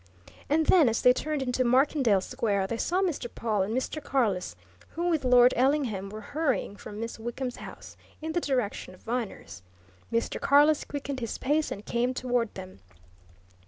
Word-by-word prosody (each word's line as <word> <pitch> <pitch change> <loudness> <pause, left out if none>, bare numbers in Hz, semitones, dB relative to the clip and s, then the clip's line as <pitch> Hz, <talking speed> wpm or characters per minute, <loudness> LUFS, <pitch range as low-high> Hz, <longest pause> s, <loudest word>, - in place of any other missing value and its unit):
And 315 +2 +3
then, 320 -8 +5
as 230 - -1
they 250 - +7
turned 295 +1 -2
into 255 0 0
Markendale 255 -4 +3
Square, 205 -4 -1
they 225 +4 -3
saw 365 +10 0
Mr. 320 -9 -2
Pawle 215 -4 -1
and 215 +6 -1
Mr. 290 +3 -3
Carless, 210 - 0 0.4
who, 345 +2 -1
with 320 -5 +1
Lord 250 0 +6
Ellingham, 250 -7 +1
were 215 +2 -8
hurrying 285 -4 -1
from 205 +1 -9
Miss 230 0 -5
Wickham's 245 +2 -4
house - - -10 0.2
in 320 +1 -4
the 345 +2 0
direction 245 - -2
of - - -23
Viner's. 225 - -5 0.5
Mr. 230 0 -1
Carless 295 +2 +4
quickened 280 -2 -5
his 230 -3 -4
pace 300 +3 0
and 205 - -6
came 245 +2 0
toward 245 -3 0
them. 185 - -9
250 Hz, 170 wpm, -28 LUFS, 220-285 Hz, 0.5 s, they